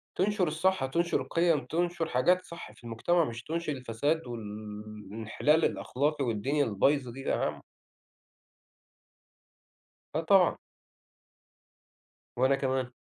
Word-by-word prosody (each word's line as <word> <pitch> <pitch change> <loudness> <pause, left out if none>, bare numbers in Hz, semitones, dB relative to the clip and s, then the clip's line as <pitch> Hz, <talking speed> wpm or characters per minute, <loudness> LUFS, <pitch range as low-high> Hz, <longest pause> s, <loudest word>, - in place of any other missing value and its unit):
تنشر 190 -2 +1
الصح، 165 -1 +1
تنشر 170 +6 0
القيم، 165 -3 +1
تنشر 170 0 -1
حاجات 180 +9 +3
صح 170 - -9
في - - -20
المجتمع، 155 +9 +1
مش 120 -2 -6
تنشر 165 -1 -2
الفساد 130 +5 -1
وال 120 -1 -5 0.7
الانحلال 115 +9 +2
الأخلاقي 145 +2 0
والدنيا 135 +6 +1
البايظة 125 +5 +1
دي 130 - -9
يا - - 0
عم. - - -2 2.5
آه، 160 - 0
طبعًا. 180 +1 +4 1.8
وأنا 130 +2 +4
كمان. 130 -2 -1
145 Hz, 110 wpm, -30 LUFS, 125-170 Hz, 2.5 s, طبعًا